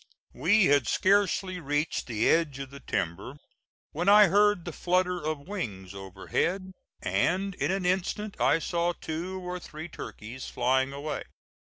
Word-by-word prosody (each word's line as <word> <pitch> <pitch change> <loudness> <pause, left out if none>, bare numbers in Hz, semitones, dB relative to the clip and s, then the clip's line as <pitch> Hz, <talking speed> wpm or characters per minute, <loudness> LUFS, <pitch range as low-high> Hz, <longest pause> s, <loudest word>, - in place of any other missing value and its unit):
We 185 - +4
had 145 -6 +3
scarcely 190 - +2
reached 145 0 -1
the 110 -3 0
edge 160 -5 +2
of 135 -1 -7
the 140 - -10
timber 95 - -3 0.5
when 180 - 0
I 210 -1 +8
heard 205 -3 +3
the 175 - -5
flutter 180 0 0
of 155 -1 -3
wings 100 - -5
overhead, 100 - -2 0.3
and 195 +3 +1
in - - -1
an 190 -1 -1
instant 190 +3 -1
I - - +4
saw 170 +1 0
two 175 +4 -5
or 180 0 -5
three 160 -1 -8
turkeys 125 -4 -8
flying 130 +2 +1
away. 145 +2 -4
170 Hz, 150 wpm, -28 LUFS, 135-185 Hz, 0.5 s, I